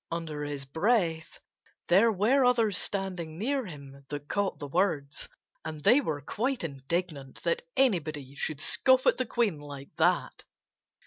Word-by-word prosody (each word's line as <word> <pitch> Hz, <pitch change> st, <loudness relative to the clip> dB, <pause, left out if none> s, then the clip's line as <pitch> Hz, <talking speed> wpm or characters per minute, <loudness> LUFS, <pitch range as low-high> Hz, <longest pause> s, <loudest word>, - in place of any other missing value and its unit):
under 160 Hz, -3 st, -4 dB
his 145 Hz, -1 st, -4 dB
breath, 165 Hz, -, 0 dB, 0.5 s
there 200 Hz, +6 st, +5 dB
were 225 Hz, +7 st, +3 dB
others 230 Hz, -5 st, +3 dB
standing 180 Hz, -6 st, -2 dB
near 260 Hz, +4 st, -1 dB
him 140 Hz, -4 st, -10 dB
that 145 Hz, 0 st, -6 dB
caught 200 Hz, +3 st, -1 dB
the 145 Hz, -, -6 dB
words. 150 Hz, -3 st, -1 dB, 0.3 s
And 155 Hz, -2 st, -6 dB
they 260 Hz, -, +6 dB
were 155 Hz, -, -3 dB
quite 245 Hz, -, -2 dB
indignant 140 Hz, -1 st, -4 dB
that 480 Hz, 0 st, +1 dB, 0.2 s
anybody 155 Hz, -, +1 dB
should 145 Hz, +1 st, -4 dB
scoff 260 Hz, +8 st, +3 dB
at -, -, +3 dB
the 255 Hz, -, 0 dB
Queen 220 Hz, -10 st, 0 dB
like 140 Hz, -1 st, -10 dB
that. -, -, +1 dB
165 Hz, 145 wpm, -29 LUFS, 145-220 Hz, 0.5 s, they